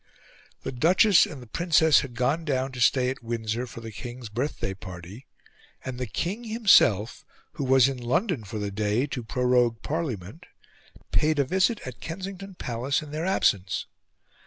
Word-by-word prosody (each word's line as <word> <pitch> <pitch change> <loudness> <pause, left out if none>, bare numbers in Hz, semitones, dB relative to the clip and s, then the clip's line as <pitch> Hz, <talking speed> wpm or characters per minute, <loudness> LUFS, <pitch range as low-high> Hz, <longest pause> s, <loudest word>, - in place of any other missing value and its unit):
The - - -3
Duchess 180 - +5
and 140 -5 -9
the - - -14
Princess 160 +2 +4
had 125 -4 -6
gone 135 +7 0
down 135 -3 -1
to 125 -1 -6
stay 125 +1 +3
at 135 - -8
Windsor 115 +1 -3
for 115 - -9
the 115 -1 -8
King's 120 +3 -8
birthday 120 -3 -3
party, 95 +5 -10 0.6
and 130 -1 -5
the 125 - -3
King 195 - -3
himself, 195 - +4 0.3
who - - -5
was 130 -1 +5
in 135 -2 -3
London 155 - 0
for 105 +2 -6
the 105 -1 -3
day 105 +5 0
to 130 -4 -5
prorogue 125 -1 +1
Parliament, 150 - -4 0.6
paid 155 0 +2
a 140 - +4
visit 190 - +1
at 130 -2 -8
Kensington 190 +2 -7
Palace 130 +2 -2
in 150 - -10
their 155 +4 -3
absence. 100 - +1
130 Hz, 165 wpm, -26 LUFS, 115-160 Hz, 0.6 s, Duchess